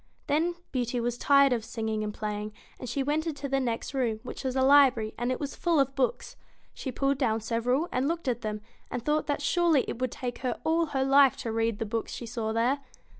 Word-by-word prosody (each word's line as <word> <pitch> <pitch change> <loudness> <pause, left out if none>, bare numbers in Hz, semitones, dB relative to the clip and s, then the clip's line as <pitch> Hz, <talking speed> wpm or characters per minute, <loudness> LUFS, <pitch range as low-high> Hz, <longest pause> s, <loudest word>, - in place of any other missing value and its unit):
Then 330 +4 +1 0.2
Beauty 245 -1 -1
was 240 0 -1
tired 275 +1 +5
of 230 -3 -1
singing 220 -1 -3
and 210 - -2
playing, 210 0 -4 0.3
and 250 - -6
she 270 +3 -1
went 305 +4 0
into 290 -3 -3
the 270 0 +1
next 240 +1 -2
room, 240 -5 0
which 250 - -7
was 260 -1 -2
a 260 - +2
library, 265 -6 +5
and 240 +1 -1
it 255 - -2
was 285 -2 -4
full 340 -3 +1
of 275 0 +2
books. 270 - -1 0.4
She 265 - -5
pulled 275 +2 0
down 225 -5 +1
several 240 +7 0
and 255 +2 0
looked 335 -1 -2
at 240 -1 0
them, 215 -1 -4 0.3
and 240 - -4
thought 300 0 +1
that 290 -1 -1
surely 335 -4 +3
it - - -5
would 255 -2 0
take 245 -1 -5
her 250 -2 -2
all 330 +1 +2
her 270 -3 0
life 275 0 +5
to 230 - -4
read 225 -1 0
the 225 - -2
books 225 +1 -3
she 240 - -6
saw 225 -1 -3
there. 240 +5 +1
255 Hz, 230 wpm, -28 LUFS, 230-280 Hz, 0.4 s, tired